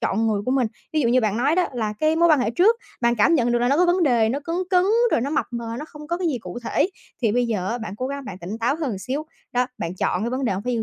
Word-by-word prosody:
chọn 225 Hz, +3 st, 0 dB
người 210 Hz, -2 st, 0 dB
của -, -, +1 dB
mình. 260 Hz, -2 st, +2 dB, 0.3 s
Ví 310 Hz, -, +2 dB
dụ 240 Hz, -, +2 dB
như 250 Hz, +2 st, +4 dB
bạn 215 Hz, -2 st, 0 dB
nói 275 Hz, +6 st, +2 dB
đó 365 Hz, -, +3 dB
là 220 Hz, -3 st, -1 dB
cái 310 Hz, +1 st, +2 dB
mối 340 Hz, +1 st, +4 dB
quan 305 Hz, -4 st, +5 dB
hệ 225 Hz, -, 0 dB
trước 390 Hz, -, +4 dB, 0.2 s
bạn 235 Hz, 0 st, +3 dB
cảm 230 Hz, +10 st, +4 dB
nhận 240 Hz, -5 st, +2 dB
được 240 Hz, -, +3 dB
là 240 Hz, +1 st, +1 dB
nó 280 Hz, -, +3 dB
có 355 Hz, +2 st, +4 dB
vấn 355 Hz, +1 st, +2 dB
đề 240 Hz, -7 st, +3 dB
nó 270 Hz, +5 st, -1 dB
cấn 330 Hz, +4 st, -3 dB
cấn, 360 Hz, -1 st, +4 dB, 0.3 s
rồi -, -, +3 dB
nó 270 Hz, +4 st, -2 dB
mập 305 Hz, -, 0 dB
mờ, 235 Hz, -1 st, -4 dB
nó 300 Hz, -, -5 dB
không 300 Hz, -1 st, -12 dB
có 340 Hz, +2 st, -1 dB
cái 355 Hz, -1 st, -1 dB
gì 270 Hz, -6 st, -1 dB
cụ 180 Hz, -1 st, -7 dB
thể 335 Hz, -, +1 dB, 0.3 s
thì 220 Hz, -3 st, +2 dB
bây 245 Hz, +1 st, +2 dB
giờ 200 Hz, -5 st, -2 dB
á 240 Hz, -, -2 dB
bạn 215 Hz, -3 st, -6 dB
cố 255 Hz, -, -3 dB
gắng 280 Hz, 0 st, -5 dB
bạn 185 Hz, -5 st, -7 dB
tỉnh 195 Hz, +5 st, -6 dB
táo 240 Hz, +5 st, +1 dB
hơn 265 Hz, -12 st, -3 dB
xíu. 275 Hz, +8 st, -4 dB, 0.3 s
Đó, 250 Hz, 0 st, +2 dB
bạn 170 Hz, +2 st, -3 dB
chọn 180 Hz, 0 st, -1 dB
cái 235 Hz, -, -1 dB
vấn 260 Hz, +2 st, -2 dB
đề 230 Hz, -, +1 dB
hông 190 Hz, +2 st, -3 dB
phải 250 Hz, -, -2 dB
yêu 230 Hz, -2 st, 0 dB
245 Hz, 335 wpm, -23 LUFS, 225-300 Hz, 0.3 s, quan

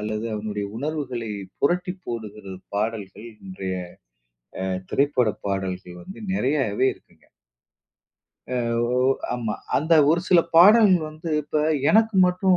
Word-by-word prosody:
அல்லது 110 Hz, +1 st, -3 dB
அவனுடைய 105 Hz, -1 st, -4 dB
உணர்வுகளை 130 Hz, -5 st, -4 dB, 0.3 s
புரட்டி 180 Hz, +4 st, +1 dB
போடுகிற 105 Hz, -4 st, -7 dB, 0.2 s
பாடல்கள், 110 Hz, 0 st, -4 dB, 0.2 s
இன்றைய 95 Hz, -, -5 dB, 0.9 s
அ -, -, -2 dB, 0.2 s
திரைப்பட 135 Hz, -5 st, +2 dB, 0.2 s
பாடல்கள் 95 Hz, -2 st, -4 dB
வந்து 190 Hz, -, -11 dB
நெறையவே 130 Hz, -, +1 dB
இருக்குங்க. -, -, -27 dB, 1.3 s
அ -, -, 0 dB, 0.4 s
ஓ -, -, +2 dB, 0.4 s
ஆமா. 115 Hz, -3 st, -3 dB, 0.2 s
அந்த 160 Hz, +4 st, 0 dB, 0.2 s
ஒரு 170 Hz, +1 st, +3 dB
சில 175 Hz, -2 st, +6 dB, 0.2 s
பாடல் 205 Hz, +3 st, +8 dB, 0.2 s
வந்து 155 Hz, +1 st, -7 dB
இப்ப, 150 Hz, +1 st, -1 dB, 0.3 s
"எனக்கு 220 Hz, 0 st, +4 dB
மட்டும் 185 Hz, 0 st, +2 dB
125 Hz, 115 wpm, -23 LUFS, 105-170 Hz, 1.3 s, பாடல்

